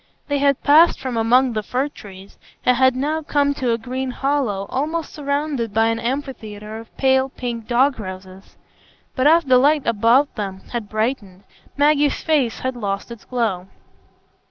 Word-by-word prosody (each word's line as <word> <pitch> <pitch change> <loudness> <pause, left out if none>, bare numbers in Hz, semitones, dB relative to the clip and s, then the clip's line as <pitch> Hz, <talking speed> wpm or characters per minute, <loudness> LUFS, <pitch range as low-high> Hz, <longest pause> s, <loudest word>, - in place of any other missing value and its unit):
They 285 0 0
had 280 -1 +1
passed 315 +4 +5
from 260 -2 -4
among 240 +3 +3
the 215 - -1
fir 255 +6 -2
trees, 195 -8 -13 0.3
and 250 - +4
had 260 0 +3
now 300 +5 -1
come 285 -2 +1
to 255 -4 -1
a 230 - +1
green 255 +3 -4
hollow 255 -7 -1
almost 310 +4 -2
surrounded 280 -6 -2
by 225 0 +3
an 225 0 -1
amphitheatre 220 -5 -5
of 225 - -11
the - - -38
pale 265 0 +2
pink 235 -4 -6
dog 255 +2 +2
roses. 185 -1 -10 0.6
But 260 +2 +2
as 330 +2 +5
the 255 -3 +4
light 290 +2 +3
about 230 +6 +3
them 195 -4 -5
had 230 -4 -4
brightened, 215 -4 -3 0.3
Maggie's 290 0 +3
face 285 -7 0
had 260 0 -2
lost 200 -1 -4
its 235 - -10
glow. 220 -7 -2
250 Hz, 170 wpm, -20 LUFS, 220-280 Hz, 0.6 s, passed